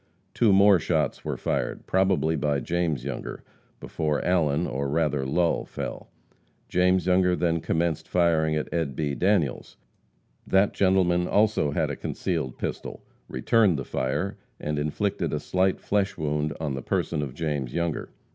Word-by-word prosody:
Two 115 Hz, -3 st, +3 dB
more 100 Hz, -1 st, +6 dB
shots 80 Hz, -1 st, -1 dB
were -, -, -3 dB
fired, -, -, -2 dB
probably 95 Hz, -4 st, +2 dB
by 75 Hz, -1 st, 0 dB
James 80 Hz, -5 st, -1 dB
Younger, 70 Hz, -, -5 dB, 0.4 s
before 75 Hz, -2 st, -2 dB
Allen, 85 Hz, -3 st, +2 dB
or 70 Hz, 0 st, -2 dB
rather 75 Hz, -3 st, 0 dB
Lull, 85 Hz, +4 st, +1 dB
fell. -, -, -6 dB, 0.6 s
James 90 Hz, 0 st, +2 dB
Younger 90 Hz, 0 st, +3 dB
then 85 Hz, -1 st, +1 dB
commenced 80 Hz, 0 st, -1 dB
firing 80 Hz, -3 st, +2 dB
at 75 Hz, -, -2 dB
Ed. 80 Hz, -6 st, -1 dB
B. 75 Hz, -1 st, -1 dB
Daniels. 90 Hz, -4 st, 0 dB, 0.7 s
That 95 Hz, +1 st, +3 dB
gentleman 90 Hz, -2 st, +2 dB
also 105 Hz, -7 st, +2 dB
had 70 Hz, -, 0 dB
a -, -, -3 dB
concealed 65 Hz, -, -3 dB
pistol, -, -, -5 dB, 0.3 s
returned 105 Hz, -8 st, +3 dB
the 70 Hz, -, -4 dB
fire 70 Hz, +10 st, -2 dB, 0.2 s
and 75 Hz, 0 st, -2 dB
inflicted 85 Hz, +4 st, -1 dB
a 75 Hz, -, 0 dB
slight 95 Hz, +3 st, +1 dB
flesh 100 Hz, -1 st, 0 dB
wound 75 Hz, -1 st, -1 dB
on 75 Hz, -4 st, -2 dB
the 65 Hz, -, -4 dB
person 75 Hz, +4 st, -1 dB
of 70 Hz, -3 st, -5 dB
James 75 Hz, -6 st, -2 dB
Younger. 85 Hz, 0 st, -2 dB
80 Hz, 150 wpm, -26 LUFS, 75-90 Hz, 0.7 s, more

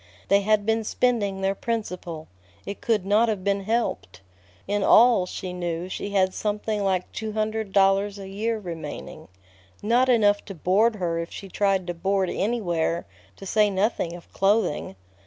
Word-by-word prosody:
They 200 Hz, 0 st, +5 dB
had 210 Hz, 0 st, +2 dB
been 225 Hz, 0 st, +1 dB
spending 210 Hz, -4 st, 0 dB
their 195 Hz, 0 st, +1 dB
principal. 180 Hz, -8 st, -4 dB, 0.4 s
It 200 Hz, -, -6 dB
could 215 Hz, -5 st, +1 dB
not 215 Hz, +4 st, +3 dB
have 205 Hz, -4 st, -2 dB
been 200 Hz, 0 st, 0 dB
helped. 200 Hz, -, -2 dB, 0.5 s
In 205 Hz, +1 st, 0 dB
all, 230 Hz, -5 st, +6 dB
she 185 Hz, 0 st, -6 dB
knew, 175 Hz, 0 st, -3 dB
she 200 Hz, -, -4 dB
had 190 Hz, -2 st, +2 dB
something 210 Hz, 0 st, -2 dB
like 185 Hz, -2 st, 0 dB
two 220 Hz, -1 st, -5 dB
hundred 215 Hz, -1 st, -2 dB
dollars 195 Hz, +1 st, +3 dB
a 195 Hz, -1 st, -8 dB
year 220 Hz, +4 st, -2 dB
remaining. 160 Hz, -4 st, -7 dB, 0.6 s
Not 245 Hz, +4 st, +3 dB
enough 205 Hz, -4 st, +4 dB
to 195 Hz, -, -8 dB
board 205 Hz, +7 st, +2 dB
her 170 Hz, -4 st, -2 dB
if 170 Hz, -, -5 dB
she 195 Hz, -, -8 dB
tried 195 Hz, -1 st, +1 dB
to 175 Hz, -, -3 dB
board 190 Hz, +2 st, 0 dB
anywhere, 175 Hz, -6 st, -1 dB, 0.3 s
to -, -, -11 dB
say 210 Hz, +2 st, +3 dB
nothing 190 Hz, -3 st, -1 dB
of 175 Hz, -, -14 dB
clothing. 195 Hz, -, +1 dB
200 Hz, 165 wpm, -25 LUFS, 185-215 Hz, 0.6 s, all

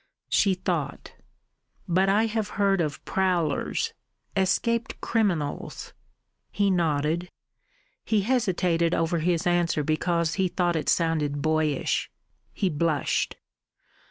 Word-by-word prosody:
She 195 Hz, -2 st, +3 dB
thought. 170 Hz, -6 st, -3 dB, 0.7 s
"But 185 Hz, +3 st, +2 dB
I 210 Hz, +3 st, +3 dB
have 220 Hz, -1 st, -1 dB
heard 195 Hz, -2 st, +3 dB
of 150 Hz, -3 st, -3 dB
prowlers 180 Hz, -6 st, 0 dB, 0.4 s
escaped 230 Hz, +5 st, 0 dB
criminals." 180 Hz, -11 st, -1 dB, 0.6 s
He 200 Hz, -1 st, +1 dB
nodded. 165 Hz, 0 st, 0 dB, 0.7 s
He 215 Hz, -2 st, +1 dB
hesitated 185 Hz, -8 st, +1 dB
over 165 Hz, +1 st, 0 dB
his 170 Hz, 0 st, 0 dB
answer 175 Hz, -3 st, +2 dB
because 170 Hz, +2 st, 0 dB
he 185 Hz, -, +3 dB
thought 175 Hz, -1 st, 0 dB
it 160 Hz, -, -1 dB
sounded 150 Hz, -4 st, +1 dB
boyish. 155 Hz, -3 st, 0 dB, 0.4 s
He 195 Hz, -, -1 dB
blushed. 155 Hz, -2 st, 0 dB
175 Hz, 105 wpm, -26 LUFS, 155-195 Hz, 0.7 s, She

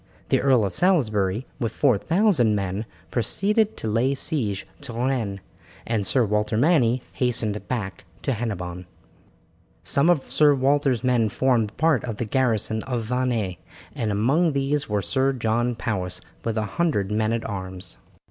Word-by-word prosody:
The -, -, +3 dB
Earl 130 Hz, -5 st, +4 dB
of 95 Hz, -, -3 dB
Salisbury, 110 Hz, -, +1 dB
with 115 Hz, -4 st, -1 dB
four 135 Hz, -6 st, +3 dB
thousand 160 Hz, -, +2 dB
men, 100 Hz, +2 st, -3 dB, 0.2 s
proceeded 205 Hz, -, +1 dB
to -, -, -4 dB
lay 120 Hz, +6 st, +1 dB
siege 115 Hz, -, -2 dB, 0.2 s
to 140 Hz, -4 st, -7 dB
Rennes, 115 Hz, -5 st, -1 dB, 0.4 s
and 110 Hz, -4 st, 0 dB
Sir 125 Hz, -4 st, +3 dB
Walter 105 Hz, +1 st, 0 dB
Manny 125 Hz, -4 st, +3 dB
hastened 110 Hz, -4 st, -1 dB
back 100 Hz, -7 st, -4 dB, 0.2 s
to 135 Hz, -, 0 dB
Hennebon. 90 Hz, -6 st, -4 dB, 1.0 s
Some 140 Hz, +5 st, +2 dB
of 160 Hz, -6 st, +3 dB
Sir 150 Hz, -2 st, +5 dB
Walter's 135 Hz, -2 st, +2 dB
men 120 Hz, -4 st, +2 dB
formed 115 Hz, -3 st, +1 dB
part 155 Hz, -6 st, +2 dB
of 115 Hz, -4 st, -4 dB
the 120 Hz, -, -2 dB
garrison 110 Hz, -2 st, 0 dB
of 120 Hz, -2 st, -2 dB
Vannes, 115 Hz, -6 st, -1 dB, 0.4 s
and 110 Hz, -2 st, -2 dB
among 140 Hz, -, +2 dB
these 140 Hz, +1 st, 0 dB
was 105 Hz, -2 st, -1 dB
Sir 135 Hz, 0 st, +1 dB
John 120 Hz, 0 st, 0 dB
Powis 90 Hz, -6 st, -3 dB, 0.2 s
with 115 Hz, -1 st, -2 dB
a 110 Hz, -, 0 dB, 0.2 s
hundred 105 Hz, -, +1 dB
men 110 Hz, +1 st, +1 dB
at 115 Hz, 0 st, -2 dB
arms. 95 Hz, -, -7 dB
115 Hz, 155 wpm, -24 LUFS, 105-135 Hz, 1.0 s, Sir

